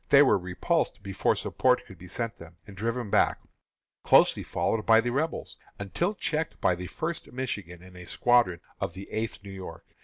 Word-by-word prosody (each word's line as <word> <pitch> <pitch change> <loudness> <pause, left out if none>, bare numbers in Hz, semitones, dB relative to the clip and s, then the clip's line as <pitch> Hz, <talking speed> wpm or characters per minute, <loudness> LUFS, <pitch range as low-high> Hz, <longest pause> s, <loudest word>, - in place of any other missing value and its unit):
They 140 0 +8
were 130 - +4
repulsed 90 +2 -1
before 95 -1 +1
support - - +1
could 95 - -14
be 90 - -11
sent 115 +4 -4
them, 85 +1 -13
and 100 - -12
driven 115 +1 -2
back, - - +3 0.6
closely - - +5
followed 110 -1 -1
by 115 0 +6
the 120 +1 0
Rebels, 155 +6 -2 0.2
until 170 - -1
checked 160 -4 -2
by 90 - +3
the 90 +1 -5
First 165 - -4
Michigan 100 -9 -5
and 90 0 -14
a 90 -1 -10
squadron 120 -9 +3 0.2
of - - -2
the 95 +1 -9
Eighth 110 -2 -3
New 100 - -9
York. 90 -4 -9
100 Hz, 185 wpm, -28 LUFS, 90-125 Hz, 0.6 s, They